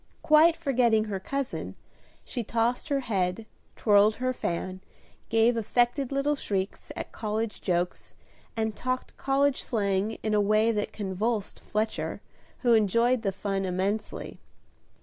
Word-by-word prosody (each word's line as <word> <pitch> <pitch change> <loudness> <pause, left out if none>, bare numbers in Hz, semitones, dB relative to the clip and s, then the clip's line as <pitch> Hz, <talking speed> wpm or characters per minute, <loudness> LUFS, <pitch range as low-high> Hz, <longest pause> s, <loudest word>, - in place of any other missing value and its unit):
Quite 315 +2 +6
forgetting 245 -8 +2
her 205 -3 -3
cousin, 275 +6 -4 0.5
she 245 - -3
tossed 235 +6 0
her 280 -1 +1
head, 195 -3 -1 0.3
twirled 210 0 +4
her 255 0 -1
fan, 185 -3 -3 0.5
gave 225 +1 +4
affected 240 +4 +1
little 275 +2 +1
shrieks 195 -7 -3
at - - -6
college 215 0 -3
jokes, 180 -1 -2 0.4
and 220 -1 -1
talked 255 +2 -3
college 275 0 +2
slang 200 -1 0
in 215 0 0
a 210 - +4
way 215 +2 +3
that 210 -2 -2
convulsed 205 +2 -2
Fletcher, 215 +1 -2 0.4
who 240 -2 +4
enjoyed 230 +3 +3
the 200 -3 0
fun 195 0 -2
immensely. 190 +3 -2
220 Hz, 130 wpm, -27 LUFS, 200-250 Hz, 0.5 s, Quite